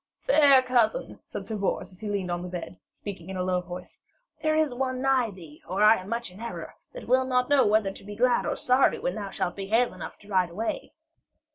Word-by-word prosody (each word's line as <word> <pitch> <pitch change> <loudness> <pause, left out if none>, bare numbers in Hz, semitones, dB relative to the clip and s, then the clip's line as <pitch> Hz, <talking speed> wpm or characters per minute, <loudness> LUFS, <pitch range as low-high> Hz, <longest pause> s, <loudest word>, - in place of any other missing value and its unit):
'Fair 285 - +6
cousin,' 250 - +1
said - - -6
Sir 220 - -3
Bors, 195 -1 -2
as 180 - -16
he 215 - -5
leaned 195 -3 -2
on 175 0 -2
the 180 - -5
bed, 175 0 -7
speaking 190 -4 -8
in 190 - -4
a 180 - -1
low 180 -1 0
voice, 180 0 -10 0.4
'there 310 0 +2
is 310 -4 +2
one 255 0 -2
nigh 260 -3 +2
thee, 165 -6 -13
or 195 +3 +1
I 220 +1 +7
am 185 +2 -8
much 235 -3 -3
in 185 - -14
error, 235 0 -6 0.2
that - - -9
will 260 +1 +4
not 250 0 +1
know 280 -5 +5
whether 210 -2 +2
to - - -13
be 205 +1 -8
glad 245 +2 +2
or - - 0
sorry 255 +2 +3
when 265 - -2
thou 205 -2 -5
shalt 175 - -2
be 195 -1 -5
hale 230 +4 +2
enough - - -8
to 205 - -19
ride 185 -3 +2
away.' 215 +7 -4
215 Hz, 240 wpm, -27 LUFS, 185-255 Hz, 0.4 s, I